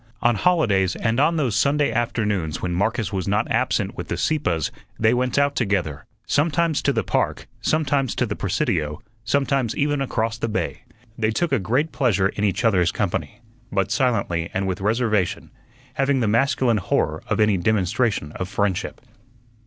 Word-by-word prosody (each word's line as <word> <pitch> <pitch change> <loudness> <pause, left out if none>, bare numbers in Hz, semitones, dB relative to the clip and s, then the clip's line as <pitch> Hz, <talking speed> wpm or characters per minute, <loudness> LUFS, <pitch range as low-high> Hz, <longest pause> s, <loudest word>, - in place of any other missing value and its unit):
On 120 0 +4
holidays 105 - +2
and 115 +2 0
on 165 +4 +3
those 130 -9 0
Sunday 145 +1 +2
afternoons 105 -9 -1
when 90 -1 -2
Marcus 100 +2 -1
was 95 -1 -2
not 105 +2 +1
absent - - 0
with - - -6
the - - -3
Sieppes 90 - 0 0.3
they 110 +1 +3
went 125 +1 0
out 140 0 +2
together, 95 - -1 0.2
sometimes 160 +1 +1
to 140 - +2
the 115 -5 0
park, - - -1 0.2
sometimes 140 -5 +1
to 125 - +1
the 105 -2 -4
Presidio, 90 - -1 0.2
sometimes 135 -2 0
even 145 -1 +1
across 115 -3 -1
the 115 - -1
bay. 110 +3 -3 0.3
They 110 -1 +2
took 165 +9 0
a 135 - +2
great 125 - 0
pleasure 100 -8 +2
in 100 - -4
each 105 +4 0
other's 90 -6 +3
company, 95 -3 -3 0.3
but 95 -2 0
silently 90 -10 0
and 95 +1 0
with 95 +1 -3
reservation, 110 -3 0 0.4
having 135 0 +1
the 115 - +1
masculine 120 +1 +2
horror 90 - 0
of - - -1
any 105 -2 +4
demonstration 100 -2 0
of 95 +3 -5
friendship. 100 -2 -1
110 Hz, 170 wpm, -23 LUFS, 95-135 Hz, 0.4 s, On